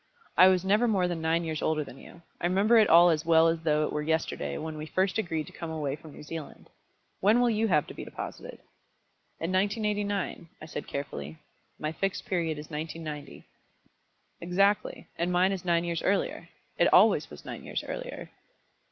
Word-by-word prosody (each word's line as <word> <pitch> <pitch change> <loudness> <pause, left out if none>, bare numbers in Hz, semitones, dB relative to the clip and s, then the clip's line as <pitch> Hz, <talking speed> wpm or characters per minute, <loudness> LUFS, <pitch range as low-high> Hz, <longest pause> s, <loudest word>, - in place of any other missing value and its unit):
I 185 - +8
was 185 -1 +3
never 210 +5 +3
more 190 -5 +2
than 175 -2 -3
nine 165 +1 +1
years 160 -2 -3
older 155 -1 0
than 135 -2 -12
you. 170 - -14 0.2
I 175 - +2
remember 205 +6 +4
it 215 - +4
all 170 +1 +8
as 155 -1 0
well 165 0 +5
as 165 0 +1
though 155 -1 +2
it - - -4
were 150 - -1
yesterday 150 - -1
when 160 0 -5
we 155 0 -6
first 190 +5 0
agreed 160 -6 -2
to - - -12
come 165 - -6
away 150 -4 -2
from 155 +1 -13
New - - -11
Zealand. 155 0 -8 0.5
When 210 +5 +4
will 245 -1 +3
you 220 +1 +1
have 155 -7 +3
to - - -10
be - - -7
deposited?" - - -8 0.8
"In 165 +2 -2
1989," 205 -2 -1
I - - -9
said 155 - -6
carefully. 80 - -5 0.4
"My 155 - -3
Fixed 195 +4 -2
Period 165 -4 -1
is 150 +2 -9
1990." 150 -2 -6 0.9
"Exactly; 195 +4 +1
and 175 +1 0
mine 180 +2 +3
is 190 -3 -3
nine 170 -1 +2
years 170 -1 -2
earlier. 200 +1 -1 0.3
It - - +4
always - - +5
was - - -12
nine - - -7
years - - -4
earlier." - - -6
170 Hz, 195 wpm, -28 LUFS, 155-195 Hz, 0.9 s, I